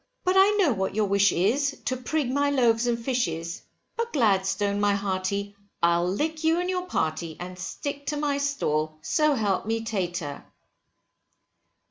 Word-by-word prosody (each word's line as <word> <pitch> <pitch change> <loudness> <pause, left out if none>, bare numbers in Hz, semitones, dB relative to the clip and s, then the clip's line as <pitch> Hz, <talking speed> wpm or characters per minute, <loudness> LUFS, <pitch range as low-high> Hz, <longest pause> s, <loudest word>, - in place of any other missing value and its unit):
But 365 +1 +2
I 400 +2 +5
know 325 -10 +4
what 190 -1 -2
your 215 -1 +2
wish 200 0 +3
is, 280 +10 +1
to 255 - 0
prig 255 +1 -1
my 285 +1 +2
loaves 240 -4 +2
and 235 -1 +1
fishes, 180 -9 -2 0.3
but 465 0 -2
Gladstone 200 -4 +2
my 205 0 +3
hearty, 200 +1 -2 0.3
I'll 170 +1 +3
lick 310 - -2
you 325 +2 +3
and 360 +1 -1
your 365 0 -2
party, 160 - -2
and 180 +1 -7
stick 285 +8 -5
to 295 +1 -1
my 290 -1 0
stall, 155 - -1
so 305 - +2
help 205 -4 0
me 225 0 -1
tater. 175 -9 -3
225 Hz, 160 wpm, -26 LUFS, 190-285 Hz, 0.3 s, I